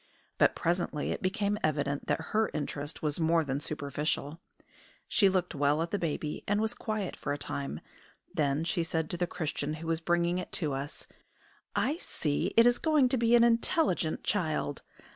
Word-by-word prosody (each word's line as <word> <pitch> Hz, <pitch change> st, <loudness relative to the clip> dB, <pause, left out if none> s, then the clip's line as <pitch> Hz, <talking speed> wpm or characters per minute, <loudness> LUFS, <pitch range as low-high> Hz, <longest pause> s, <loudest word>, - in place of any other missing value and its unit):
But -, -, +5 dB
presently 170 Hz, -3 st, -1 dB
it -, -, -3 dB
became 205 Hz, +2 st, 0 dB
evident 145 Hz, -2 st, 0 dB
that -, -, +1 dB
her 220 Hz, +1 st, +3 dB
interest 145 Hz, 0 st, -4 dB
was 150 Hz, +1 st, 0 dB
more 165 Hz, 0 st, +3 dB
than 140 Hz, -1 st, -2 dB
superficial. 150 Hz, +1 st, -3 dB, 0.7 s
She 200 Hz, -3 st, +4 dB
looked 185 Hz, -2 st, 0 dB
well 145 Hz, +2 st, +2 dB
at 170 Hz, -, -6 dB
the 205 Hz, -, 0 dB
baby 155 Hz, -2 st, -3 dB
and 205 Hz, +1 st, +2 dB
was 220 Hz, +2 st, +1 dB
quiet 215 Hz, -5 st, -3 dB
for -, -, -3 dB
a -, -, -3 dB
time; 140 Hz, -, -4 dB, 0.5 s
then 145 Hz, 0 st, +1 dB
she 170 Hz, +1 st, 0 dB
said 160 Hz, -1 st, -2 dB
to 175 Hz, -, -2 dB
the 175 Hz, 0 st, 0 dB
Christian 150 Hz, -2 st, -2 dB
who 160 Hz, +1 st, -8 dB
was 165 Hz, 0 st, -1 dB
bringing 175 Hz, +1 st, +1 dB
it 180 Hz, -, -6 dB
to 155 Hz, -6 st, 0 dB
us: 140 Hz, +3 st, -5 dB, 0.7 s
"I 295 Hz, +4 st, +1 dB
see 150 Hz, -, -1 dB
it 230 Hz, -, +8 dB
is 245 Hz, 0 st, +4 dB
going 300 Hz, -5 st, +3 dB
to 260 Hz, -, +1 dB
be 235 Hz, 0 st, +4 dB
an 235 Hz, -, +6 dB
intelligent 230 Hz, -, +2 dB
child. 155 Hz, -7 st, -1 dB
165 Hz, 180 wpm, -30 LUFS, 150-205 Hz, 0.7 s, it